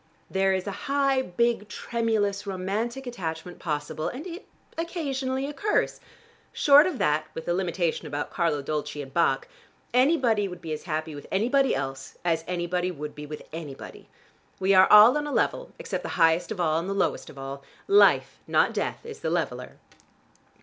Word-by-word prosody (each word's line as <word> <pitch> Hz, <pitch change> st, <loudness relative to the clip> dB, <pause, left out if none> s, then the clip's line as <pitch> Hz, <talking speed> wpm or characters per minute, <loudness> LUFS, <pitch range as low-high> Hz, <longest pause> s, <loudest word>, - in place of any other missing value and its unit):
There 195 Hz, 0 st, +2 dB
is 190 Hz, -1 st, -1 dB
a 200 Hz, -, -3 dB, 0.2 s
high, 275 Hz, -1 st, +2 dB
big, 235 Hz, 0 st, 0 dB
tremulous, 210 Hz, -4 st, -1 dB
romantic 210 Hz, +7 st, -3 dB
attachment 175 Hz, -7 st, -5 dB
possible, 150 Hz, -1 st, -3 dB
and 270 Hz, +7 st, -6 dB
it 360 Hz, +2 st, -8 dB, 0.3 s
occasionally 275 Hz, -6 st, -2 dB
occurs. 310 Hz, +9 st, 0 dB, 0.5 s
Short 290 Hz, +3 st, +6 dB
of 360 Hz, -, -3 dB
that, 150 Hz, -3 st, +1 dB
with 160 Hz, -, -6 dB
the 175 Hz, -, 0 dB
limitation 175 Hz, -3 st, -1 dB
about 145 Hz, 0 st, -4 dB
Carlo 160 Hz, -5 st, 0 dB
Dolci 150 Hz, 0 st, -3 dB
and 135 Hz, -1 st, -13 dB
Bach, 170 Hz, -, +2 dB, 0.5 s
anybody 250 Hz, -6 st, +3 dB
would 180 Hz, -2 st, -8 dB
be 160 Hz, -2 st, -5 dB
as 155 Hz, -, -6 dB
happy 155 Hz, -1 st, -3 dB
with 145 Hz, -, -9 dB
anybody 255 Hz, +7 st, +2 dB
else, 135 Hz, 0 st, -5 dB
as 165 Hz, -2 st, +1 dB
anybody 180 Hz, 0 st, -1 dB
would 150 Hz, -3 st, -6 dB
be 150 Hz, 0 st, -8 dB
with 150 Hz, 0 st, -7 dB
anybody. 155 Hz, -4 st, -8 dB, 0.5 s
We 190 Hz, +1 st, +3 dB
are 185 Hz, 0 st, +6 dB
all 215 Hz, +5 st, +9 dB
on 295 Hz, -, -4 dB
a -, -, -4 dB
level, -, -, 0 dB
except -, -, -4 dB
the -, -, -6 dB
highest 165 Hz, +2 st, +3 dB
of 210 Hz, -, -4 dB
all, 160 Hz, -2 st, +2 dB
and 175 Hz, +3 st, -4 dB
the -, -, 0 dB
lowest 200 Hz, -, -1 dB
of -, -, -13 dB
all. 135 Hz, +1 st, -6 dB, 0.3 s
Life, 405 Hz, +1 st, +4 dB
not -, -, +3 dB
death, -, -, -3 dB
is 455 Hz, -1 st, -8 dB
the -, -, -2 dB
leveler!" -, -, -3 dB
190 Hz, 175 wpm, -26 LUFS, 160-255 Hz, 0.5 s, all